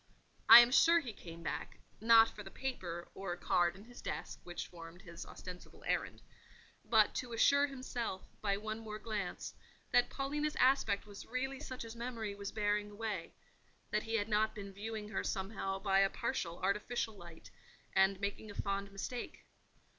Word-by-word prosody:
I 240 Hz, -, +14 dB
am 240 Hz, +1 st, +3 dB
sure 335 Hz, +5 st, +6 dB
he 245 Hz, -9 st, -6 dB
came 170 Hz, -3 st, -10 dB
back—not 225 Hz, +6 st, +3 dB
for 210 Hz, -, -10 dB
the 195 Hz, -, -9 dB
paper, 180 Hz, -10 st, -5 dB
or 195 Hz, -2 st, -4 dB
card 175 Hz, 0 st, +2 dB
in 195 Hz, -, -12 dB
his 245 Hz, +1 st, -12 dB
desk, 160 Hz, +3 st, -5 dB
which 175 Hz, 0 st, -5 dB
formed 170 Hz, +1 st, -11 dB
his 170 Hz, -4 st, -9 dB
ostensible 180 Hz, -1 st, -10 dB
errand—but 220 Hz, -2 st, -1 dB
to 245 Hz, -2 st, -4 dB
assure 280 Hz, +5 st, +5 dB
himself, 250 Hz, -7 st, -4 dB
by 200 Hz, -2 st, +1 dB
one 215 Hz, +1 st, -4 dB
more 215 Hz, -1 st, -6 dB
glance, 215 Hz, -4 st, -4 dB, 0.4 s
that 245 Hz, 0 st, +4 dB
Paulina's 295 Hz, +2 st, -2 dB
aspect 250 Hz, -6 st, +3 dB
was 205 Hz, -1 st, -10 dB
really 265 Hz, +2 st, -2 dB
such 255 Hz, -5 st, -6 dB
as 225 Hz, 0 st, -8 dB
memory 230 Hz, -3 st, -4 dB
was 200 Hz, 0 st, -6 dB
bearing 210 Hz, -1 st, 0 dB
away: 210 Hz, 0 st, -4 dB, 0.6 s
that 210 Hz, -, +2 dB
he 225 Hz, +1 st, -3 dB
had 205 Hz, -2 st, +1 dB
not 215 Hz, 0 st, +2 dB
been 200 Hz, -2 st, -7 dB
viewing 210 Hz, +1 st, -5 dB
her -, -, -2 dB
somehow 195 Hz, -1 st, -2 dB
by 195 Hz, 0 st, +2 dB
a 195 Hz, 0 st, +5 dB
partial, 170 Hz, -2 st, -2 dB
artificial 210 Hz, +3 st, -1 dB
light, 170 Hz, -4 st, -12 dB, 0.4 s
and 190 Hz, 0 st, +4 dB
making 205 Hz, +2 st, -3 dB
a 205 Hz, -, -9 dB
fond 200 Hz, 0 st, -2 dB
mistake. 235 Hz, +5 st, -6 dB
210 Hz, 165 wpm, -35 LUFS, 195-235 Hz, 0.6 s, I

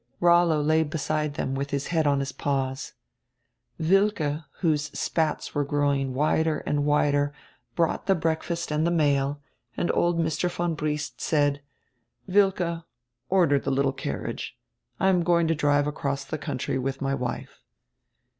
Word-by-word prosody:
Rollo 170 Hz, -3 st, +4 dB
lay 155 Hz, +2 st, +3 dB
beside 155 Hz, -1 st, -2 dB
them 135 Hz, -, -2 dB
with 140 Hz, +1 st, -2 dB
his 140 Hz, 0 st, -2 dB
head 160 Hz, -2 st, +2 dB
on 140 Hz, -1 st, +2 dB
his 135 Hz, -, -3 dB
paws. 135 Hz, -2 st, -2 dB, 0.9 s
Wilke, 165 Hz, -4 st, +1 dB, 0.2 s
whose 155 Hz, -4 st, +2 dB
spats 160 Hz, -2 st, -1 dB
were 145 Hz, -, +1 dB
growing 140 Hz, -2 st, 0 dB
wider 155 Hz, +2 st, +1 dB
and 145 Hz, 0 st, 0 dB
wider, 145 Hz, -1 st, +2 dB, 0.4 s
brought 165 Hz, -1 st, 0 dB
the 195 Hz, -, +4 dB
breakfast 165 Hz, 0 st, -2 dB
and 155 Hz, +2 st, +1 dB
the -, -, +2 dB
mail, 145 Hz, -3 st, +1 dB, 0.3 s
and 175 Hz, -, +1 dB
old 175 Hz, 0 st, +2 dB
Mr. 165 Hz, +1 st, 0 dB
von 175 Hz, -1 st, -1 dB
Briest 150 Hz, -1 st, -3 dB
said: 145 Hz, -2 st, +1 dB, 0.6 s
"Wilke, 185 Hz, -4 st, +1 dB, 0.5 s
order 170 Hz, -7 st, +4 dB
tire 135 Hz, -, -2 dB
little 135 Hz, 0 st, +1 dB
carriage. 70 Hz, -, -5 dB, 0.4 s
I 190 Hz, -, +2 dB
am 180 Hz, -2 st, +3 dB
going 170 Hz, -1 st, +3 dB
to -, -, +4 dB
drive 145 Hz, -1 st, +2 dB
across 140 Hz, -2 st, -2 dB
the 155 Hz, -, -5 dB
country 130 Hz, -2 st, -2 dB
with 135 Hz, +1 st, -3 dB
my 135 Hz, 0 st, -1 dB
wife." 125 Hz, -3 st, -4 dB
150 Hz, 150 wpm, -26 LUFS, 140-165 Hz, 0.9 s, Rollo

